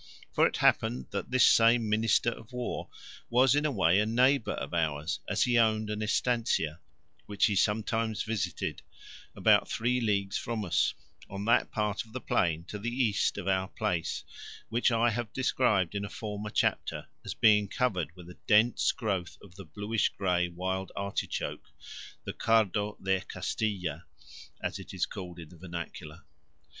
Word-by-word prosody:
For - - +5
it - - -4
happened 65 +1 +2
that - - -4
this 125 -2 +5
same 115 0 +5
Minister 110 +2 +2
of 115 0 -11
War 125 -1 -4 0.4
was 125 +1 +5
in 145 +1 +2
a - - -1
way 95 -5 +3
a 105 - +2
neighbour 125 +3 +3
of - - -6
ours, 80 -2 -1
as - - +2
he 120 -1 +3
owned 110 -1 +2
an 105 0 -3
estancia, 110 -8 0 0.5
which 105 -1 +2
he 105 - +1
sometimes 110 +1 0
visited, 110 -5 -3 0.5
about - - +4
three 125 +2 0
leagues 100 -3 0
from 115 -3 -3
us, 90 - +1 0.3
on 100 +1 -5
that 115 - +3
part 105 -1 -1
of 110 -1 -19
the 130 - -3
plain 85 -8 0
to 105 +4 -7
the 115 +4 -2
east 120 -6 +1
of 100 -2 -5
our 95 -1 +1
place 85 -3 -2 0.5
which 120 +2 +2
I 115 +1 +3
have 120 0 -3
described 110 -8 +1
in 100 0 -2
a 100 - -5
former 105 -1 -5
chapter - - 0 0.2
as - - -5
being 105 -2 +5
covered 95 - -1
with 90 -2 -12
a 90 - -13
dense 110 +3 +4
growth 95 -6 -3
of 100 -4 -15
the 95 0 -11
bluish 105 +6 -1
grey 90 -2 0
wild 95 +2 -3
artichoke, 100 0 -3 0.6
the - - -5
cardo 105 -2 +1
de 95 -1 +1
Castilla, 95 -3 -3 0.6
as - - -2
it - - -9
is - - +1
called 90 -2 -8
in 80 -3 -10
the 90 - -15
vernacular. 85 -2 -8
105 Hz, 170 wpm, -29 LUFS, 90-115 Hz, 0.6 s, For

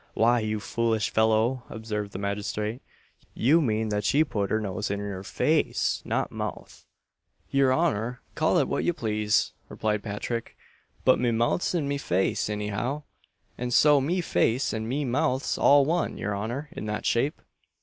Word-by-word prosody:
"Why, 120 +2 +4
you 110 -1 -2
foolish 115 0 0
fellow," 110 +3 +2
observed 105 -2 -4
the - - -6
magistrate, 105 +3 -3 0.5
"you 150 +8 +4
mean 110 -5 0
that 105 0 -1
she 145 +9 +4
put 105 -9 -2
her 110 - +1
nose 100 -1 -3
in 100 - -1
your 100 -2 -5
face 95 - 0
not - - -1
mouth." - - -6 0.6
"Your 135 -1 +4
honour'll 125 -6 0 0.2
call - - +2
it - - +2
what - - -1
ye 175 - +1
plase," 105 -6 0 0.2
replied 105 -1 -1
Patrick, 115 +2 -4 0.5
"but 130 - +5
me 120 - +2
mouth's 120 +11 +1
in 155 -5 0
me 140 0 -1
face 95 -4 0
any 105 0 -2
how; 125 +9 -2 0.6
and 125 0 -2
so 145 +2 +5
me 175 +7 0
face 125 -7 +1
and 110 0 -3
me 140 +3 -1
mouth's 130 +1 0
all 140 -1 +5
one, 170 +3 0
your 105 0 -2
honour, 120 +9 -4
in - - -6
that 105 0 -3
shape." 135 +6 +1
115 Hz, 170 wpm, -27 LUFS, 105-135 Hz, 0.6 s, but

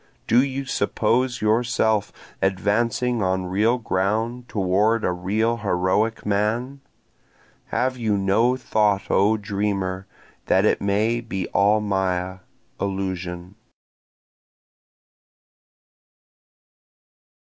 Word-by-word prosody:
Do 120 +3 +4
you 135 0 -3
suppose 125 0 0
yourself 110 -1 +1 0.3
advancing 110 +5 0
on 95 -1 0
real 105 +7 +1
ground 110 +3 -2
toward 105 +3 +1
a - - +1
real 105 +6 0
heroic 105 +2 0
man? 110 +7 -1 0.9
Have 130 0 -1
you 110 -4 0
no 110 +6 +2
thought 105 -5 0
O 105 +3 +3
dreamer 100 -2 -2 0.4
that - - +3
it - - +2
may 110 +4 +1
be 95 -6 -4
all 105 +3 +3
maya, 95 -2 -1 0.4
illusion? 95 -2 -4
105 Hz, 90 wpm, -23 LUFS, 95-115 Hz, 0.9 s, Do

